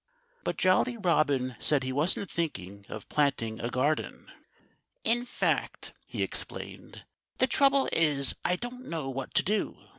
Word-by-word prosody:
But - - -2
Jolly 190 +6 +3
Robin 145 - +1
said 145 -3 +2
he 130 0 -3
wasn't 165 +7 +1
thinking 100 - -4
of 110 -3 -8
planting 125 -7 0
a 120 - -2
garden. 140 +5 -1 0.7
"In 240 +1 +2
fact," - - -1
he - - -2
explained, - - -6 0.3
"the - - +4
trouble 275 -1 +4
is, 145 -4 +4
I 180 - +3
don't 245 +5 -7
know 155 -5 -3
what 135 0 -6
to - - +5
do. 210 +2 -1
150 Hz, 145 wpm, -29 LUFS, 130-200 Hz, 0.7 s, to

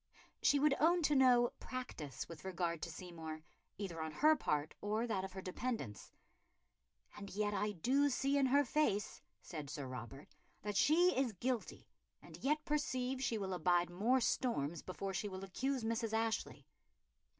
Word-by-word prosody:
She 285 - +5
would 290 0 +4
own 340 +3 +4
to 295 -1 +3
no 250 -2 +5
"practice" 165 - -6
with 165 - -10
regard 175 -3 -2
to - - -3
Seymour, 160 -2 -7 0.3
either 175 -5 -4
on 160 0 -3
her 310 - +5
part 150 - -1
or 215 +3 0
that 205 -5 -1
of 190 -1 -6
her 190 -1 -6
dependants. 185 - -4 1.0
"And 200 -1 -8
yet 205 +1 -1
I 210 +1 0
do 270 - +2
see 275 +1 +1
in 275 -2 +4
her 280 +3 +5
face," 230 -7 0 0.2
said 150 -5 -6
Sir 145 -2 -5
Robert, 130 +2 -8 0.3
"that 210 0 -3
she 345 - +5
is 260 -4 +1
guilty, 240 +4 -3 0.3
and - - -12
yet 300 +3 0
perceive 260 -3 -1
she 235 -3 0
will 190 -2 -3
abide 175 -1 +2
more 225 +9 +3
storms 170 - 0
before 195 +1 -5
she 205 +3 -2
will 190 0 -6
accuse 260 +6 -2
Mrs. 225 0 -1
Ashley." 225 0 -1
210 Hz, 165 wpm, -37 LUFS, 175-260 Hz, 1.0 s, She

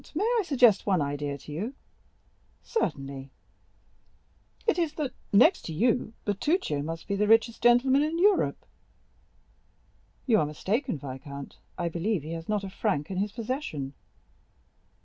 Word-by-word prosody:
"Count, - - -19
may 400 +8 +1
I - - +1
suggest 245 - +4
one 190 -3 +3
idea 145 0 -2
to 150 - -12
you?" 210 - -4 0.9
"Certainly." 140 - -3 1.4
"It 445 -5 +2
is 325 -3 0
that, 295 -5 -3 0.2
next 255 - +6
to 160 - -4
you, 230 +5 +1
Bertuccio 205 - 0
must 165 +2 -5
be 200 - 0
the 210 +1 +1
richest 225 +1 +3
gentleman 250 +3 +5
in 310 +2 0
Europe." 395 +2 +2 1.6
"You 225 -5 +4
are - - +2
mistaken, 205 - -1
viscount; 140 +1 -8 0.2
I 175 -2 -1
believe 170 +1 -1
he 155 - -6
has 165 +2 -6
not 210 -1 0
a 195 - -5
franc 190 -6 -1
in 185 - -3
his 205 +2 0
possession." 220 - -4
205 Hz, 150 wpm, -28 LUFS, 150-255 Hz, 1.6 s, next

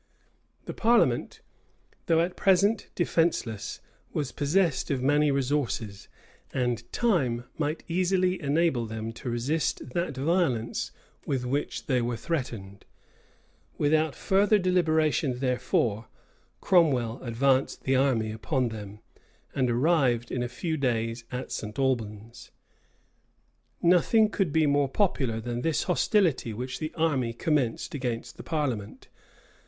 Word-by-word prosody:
The - - -5
parliament, 220 - +2 0.7
though 165 0 +4
at 180 +2 -1
present 200 +3 +2
defenceless, 165 - 0 0.3
was 145 -4 -2
possessed 155 +1 +1
of 130 -3 -1
many 145 +2 +3
resources; 130 -7 -1 0.4
and 120 -2 -2
time 135 - +1 0.2
might 150 +1 -1
easily 185 +1 +1
enable 145 -5 +1
them 110 +1 -5
to 125 - -6
resist 130 +4 -1
that 170 -4 -2
violence 135 -7 0 0.4
with 130 -3 -1
which 140 +4 -2
they 130 -3 +1
were 120 0 -2
threatened. 115 -11 -4 0.9
Without 155 0 +2
further 200 +2 +3
deliberation, 160 -7 +1
therefore, 120 -4 0 0.5
Cromwell 130 -10 +2
advanced 130 +3 +1
the 135 - +1
army 125 -5 +2
upon 115 +4 -1
them, 105 -2 -8 0.5
and 130 -2 +1
arrived 125 -2 +2
in 125 - -1
a 120 - -2
few 160 +6 -3
days 115 -3 -1
at 125 0 -5
St. 105 +2 -5
Albans. 115 -4 -2 1.3
Nothing 180 +5 +4
could 190 -8 0
be 160 +1 +3
more 145 -1 +2
popular 135 - 0
than 120 +1 -4
this 165 +1 0
hostility 175 - +1
which 125 +3 -5
the 155 -1 -3
army 140 -8 0
commenced 135 -3 -1
against 125 -5 -4
the - - -8
parliament. 130 -10 -3
135 Hz, 120 wpm, -27 LUFS, 120-165 Hz, 1.3 s, though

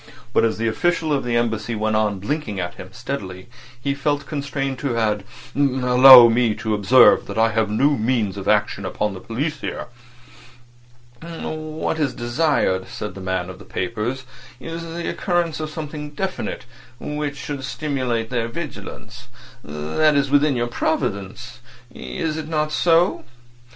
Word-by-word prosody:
But - - +4
as 115 -1 +1
the 115 +1 -1
official 160 +6 +1
of 140 - 0
the 120 -1 -1
Embassy 115 -1 -1
went 110 0 0
on 105 -2 +1
blinking 110 0 -3
at 90 -1 -3
him 90 - -10
steadily 105 -6 -6 0.3
he 140 +3 -1
felt 145 +1 -1
constrained 140 -2 -3
to 130 -5 -2
add: 105 -3 0 0.3
"Allow 130 -2 +8
me 115 -1 +2
to 110 - -2
observe 115 +5 +5
that 100 - -6
I 115 0 +3
have 110 -1 +1
no 135 +8 +3
means 115 -6 0
of 100 -1 -6
action 105 -1 +1
upon 105 +2 -2
the 95 - -8
police 140 - -3
here." - - -5 1.3
"What 160 -1 -4
is 145 -4 0
desired," 120 - 0
said 105 - -6
the 95 - -9
man 95 -1 -2
of 95 - -11
papers, 115 +7 -3 0.4
"is 165 +4 -6
the 165 +1 -5
occurrence 175 -3 -1
of 155 -1 -3
something 150 -1 -6
definite 185 +2 -4 0.3
which 150 -1 -4
should 140 -1 -5
stimulate 125 -4 -2
their 120 -2 0
vigilance. 115 -3 -8 0.4
That 80 - +1
is 140 -1 +1
within 145 -1 +4
your 120 -1 0
province—is 120 - -4
it 155 -1 -5
not 155 -1 -1
so?" 170 +3 +3
125 Hz, 150 wpm, -21 LUFS, 110-150 Hz, 1.3 s, Allow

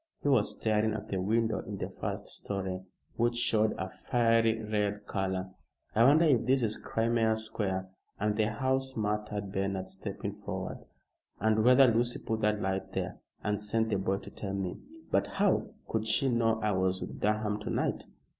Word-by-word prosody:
He - - 0
was 135 - +3
staring 110 0 +1
at 110 - -6
the 95 -2 -1
window 110 +1 +1
in - - -6
the - - -3
first - - -3
storey, 95 -2 -3 0.4
which 120 +1 +2
showed 110 -2 +2
a 95 - -2
fiery 115 +2 +2
red 105 -1 -1
color. 95 -1 -2 0.4
"I 115 - +5
wonder 155 +5 +6
if 135 -7 +4
this 130 -1 +3
is 110 -1 0
Crimea 115 -1 +1
Square 100 -4 -2 0.3
and 105 0 +1
the 110 0 +2
house," 130 +3 0
muttered 105 -1 -2
Bernard, 95 -1 -2
stepping 100 +1 -5
forward. 95 -2 -4 0.6
"And 110 +1 +3
whether 125 +3 +7
Lucy 120 0 +2
put 110 0 -3
that 105 0 +2
light 95 -1 -2
there, - - -3 0.2
and 105 0 0
sent 110 +2 0
the 100 - +1
boy 95 0 0
to - - -10
tell 100 -1 -4
me. 95 -2 -3 0.3
But - - +2
how 200 -1 +3 0.2
could 110 0 -1
she 135 +5 +3
know 115 -2 +2
I 105 - +2
was 95 -1 +1
with - - -6
Durham 105 0 0
to 105 - -5
night?" - - -1
105 Hz, 180 wpm, -30 LUFS, 100-115 Hz, 0.6 s, whether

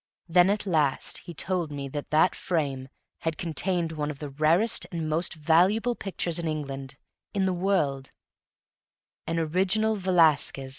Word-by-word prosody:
Then 175 +2 +4
at 205 +1 -1
last 155 -7 +1
he 170 - -11
told 175 -2 -1
me 140 -1 -5
that 145 +1 -6
that 155 +4 +3
frame 140 -7 -2 0.3
had 160 -1 -3
contained 170 0 -1
one 150 -2 -3
of 150 - -6
the 145 -1 -7
rarest 165 +10 +2
and 165 -3 -3
most 165 +3 0
valuable 180 +10 +3
pictures 180 -5 -3
in 170 - -2
England 135 -3 -5 0.4
in 195 -1 +1
the 185 - +1
world 165 -8 0 1.2
an 165 - -1
original 190 +7 +1
Velasquez. 165 -8 +3
165 Hz, 150 wpm, -26 LUFS, 150-185 Hz, 1.2 s, Then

